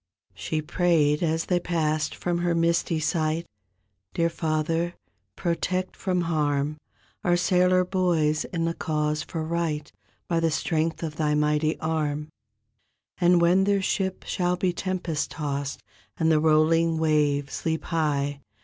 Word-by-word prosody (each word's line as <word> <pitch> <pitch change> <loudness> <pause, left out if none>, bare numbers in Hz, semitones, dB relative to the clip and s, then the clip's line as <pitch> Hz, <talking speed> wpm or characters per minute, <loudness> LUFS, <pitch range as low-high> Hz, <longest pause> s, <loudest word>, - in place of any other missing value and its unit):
She 155 -1 -3
prayed 155 -3 +2
as 160 -1 0
they 180 -1 +1
passed 155 -3 -1
from 175 -1 -1
her 175 -1 +1
misty 165 -1 +1
sight, 160 +1 0 0.7
"Dear 170 0 +1
Father, 165 +2 -1 0.4
protect 185 +1 -1
from 185 -2 -1
harm 150 -3 0 0.5
Our 175 0 +3
sailor 180 +1 +3
boys 175 -5 +1
in 165 -2 -2
the 165 - 0
cause 150 -2 -1
for 160 -2 -4
right. 160 -2 -2 0.4
By 170 -1 +1
the 165 0 +2
strength 160 +1 -1
of 155 -1 -4
Thy 150 -1 +1
mighty 150 +1 +1
arm; 155 -2 -2 0.9
And 175 -1 +5
when 180 +3 +4
their 200 0 +2
ship 190 -1 -1
shall 180 0 0
be 180 0 0
tempest 180 -4 -2
tossed 140 -2 -4 0.3
And 160 -1 +2
the 155 - +4
rolling 160 +1 +3
waves 150 -3 +1
leap 160 -2 -1
high. 145 -3 -1
160 Hz, 140 wpm, -26 LUFS, 150-175 Hz, 0.9 s, And